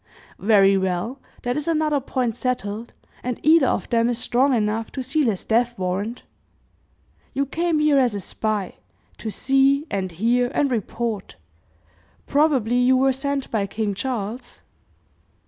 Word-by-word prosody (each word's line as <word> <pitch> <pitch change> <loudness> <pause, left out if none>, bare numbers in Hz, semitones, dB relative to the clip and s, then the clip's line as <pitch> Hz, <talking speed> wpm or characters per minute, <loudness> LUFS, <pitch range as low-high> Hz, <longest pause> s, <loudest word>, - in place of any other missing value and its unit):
"Very 195 -2 +4
well, 190 +8 -2 0.2
that 245 0 -1
is 300 +2 -3
another 310 -3 +1
point 250 -3 -2
settled, 235 -3 -3 0.3
and 250 -1 -3
either 310 -3 +5
of - - -1
them 230 0 +3
is 240 - -1
strong 255 +3 +2
enough 220 -1 0
to 265 - -3
seal 275 +2 +1
his 200 -5 -1
death 240 +1 +1
warrant. 190 +6 -3 1.1
You 275 +1 +1
came 330 +3 0
here 300 -2 +4
as 245 -5 +2
a - - -2
spy, 210 0 -3 0.4
to 220 - -4
see 270 +6 +2
and 190 -2 -2
hear 235 +8 +1
and 280 -2 +2
report 225 -2 -3 0.9
probably 275 -6 +2
you 250 +1 +4
were 265 +1 +3
sent 275 +1 -3
by 205 -3 0
King 210 0 -2
Charles?" 240 +2 -5
245 Hz, 145 wpm, -23 LUFS, 210-270 Hz, 1.1 s, either